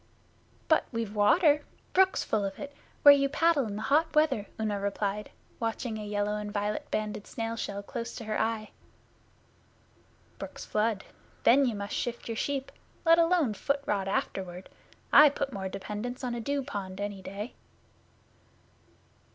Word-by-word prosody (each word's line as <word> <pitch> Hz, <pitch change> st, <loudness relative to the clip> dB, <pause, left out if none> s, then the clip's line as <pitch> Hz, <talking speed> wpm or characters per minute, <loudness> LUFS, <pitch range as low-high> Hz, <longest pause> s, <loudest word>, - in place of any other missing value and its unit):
'But 315 Hz, -, +4 dB
we've 230 Hz, -3 st, -3 dB
water 290 Hz, -, +4 dB, 0.3 s
brooks 380 Hz, 0 st, +4 dB
full 210 Hz, -, 0 dB
of 195 Hz, -1 st, -3 dB
it 285 Hz, 0 st, -8 dB, 0.3 s
where 285 Hz, -1 st, +11 dB
you 275 Hz, -1 st, +2 dB
paddle 305 Hz, -3 st, +3 dB
in 205 Hz, -1 st, -5 dB
hot 300 Hz, +9 st, +1 dB
weather,' 270 Hz, -10 st, +3 dB
Una 210 Hz, -2 st, -1 dB
replied, 200 Hz, +1 st, -2 dB, 0.3 s
watching 225 Hz, -1 st, -2 dB
a -, -, -5 dB
yellow 205 Hz, 0 st, -1 dB
and 210 Hz, 0 st, -5 dB
violet 205 Hz, 0 st, -2 dB
banded 210 Hz, -1 st, -3 dB
snail 225 Hz, 0 st, -3 dB
shell 200 Hz, -3 st, -4 dB
close 235 Hz, +2 st, -5 dB
to 230 Hz, -, -7 dB
her 215 Hz, 0 st, -1 dB
eye. 220 Hz, -1 st, -2 dB, 1.7 s
'Brooks -, -, -7 dB
flood. 215 Hz, -1 st, 0 dB, 0.4 s
Then 270 Hz, +3 st, +6 dB
you 235 Hz, -, -1 dB
must 200 Hz, 0 st, -5 dB
shift 240 Hz, -1 st, -3 dB
your 230 Hz, -, -3 dB
sheep 275 Hz, +3 st, -2 dB, 0.3 s
let 330 Hz, +1 st, +6 dB
alone 330 Hz, -8 st, +3 dB
foot 280 Hz, +6 st, -1 dB
rot 195 Hz, -2 st, 0 dB
afterward. 185 Hz, -2 st, -3 dB, 0.4 s
I 300 Hz, 0 st, +10 dB
put 275 Hz, -1 st, -3 dB
more 190 Hz, -2 st, -3 dB
dependence 210 Hz, +6 st, -5 dB
on 245 Hz, -1 st, -1 dB
a 240 Hz, -, -3 dB
dew 280 Hz, +4 st, -1 dB
pond 190 Hz, -5 st, -6 dB
any 205 Hz, -1 st, -4 dB
day. 200 Hz, +5 st, -6 dB
220 Hz, 155 wpm, -29 LUFS, 205-275 Hz, 1.7 s, where